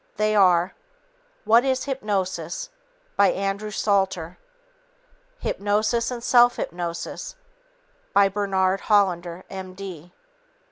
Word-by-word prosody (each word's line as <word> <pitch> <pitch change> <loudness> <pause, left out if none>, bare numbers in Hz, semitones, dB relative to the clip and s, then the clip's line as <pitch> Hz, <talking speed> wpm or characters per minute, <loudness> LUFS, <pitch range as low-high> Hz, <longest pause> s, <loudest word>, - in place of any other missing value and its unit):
They 215 0 +1
are: 180 -2 +4 0.7
What 230 +2 +5
is 260 -1 0
Hypnosis 200 - -3 0.5
by 200 - +5
Andrew 195 +2 -2
Salter, 190 -5 -1 1.0
Hypnosis 215 - 0
and 240 -2 -6
Self 245 0 +5
Hypnosis 170 - -5 0.8
by 200 -1 +5
Bernard 195 -1 0
Hollander, 180 -4 +2
M.D. 185 -3 -8
195 Hz, 90 wpm, -24 LUFS, 185-215 Hz, 1.0 s, What